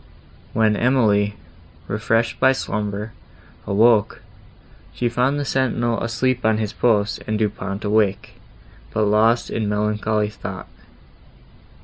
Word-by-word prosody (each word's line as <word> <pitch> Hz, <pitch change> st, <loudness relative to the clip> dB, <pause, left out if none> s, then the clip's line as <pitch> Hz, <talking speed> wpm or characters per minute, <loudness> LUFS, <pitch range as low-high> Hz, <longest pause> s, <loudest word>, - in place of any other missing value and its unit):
When 110 Hz, -1 st, +2 dB
Emily, 105 Hz, -5 st, +2 dB, 0.5 s
refreshed 115 Hz, +2 st, 0 dB
by 130 Hz, 0 st, +5 dB
slumber, 105 Hz, -2 st, -4 dB, 0.5 s
awoke, 105 Hz, +1 st, +3 dB, 0.7 s
she 120 Hz, -, 0 dB
found 125 Hz, +5 st, 0 dB
the 145 Hz, -, -2 dB
sentinel 120 Hz, -3 st, 0 dB
asleep 125 Hz, +2 st, -1 dB
on 110 Hz, -1 st, +2 dB
his 110 Hz, -1 st, -3 dB
post 105 Hz, -4 st, +1 dB
and 110 Hz, 0 st, 0 dB
Du 105 Hz, -1 st, +1 dB
Pont 100 Hz, +1 st, -6 dB
awake, 105 Hz, -2 st, +1 dB, 0.6 s
but 110 Hz, -, 0 dB
lost 110 Hz, +3 st, +2 dB
in 110 Hz, -2 st, -1 dB
melancholy 105 Hz, 0 st, 0 dB
thought. 105 Hz, -, -7 dB
110 Hz, 115 wpm, -21 LUFS, 105-120 Hz, 0.7 s, by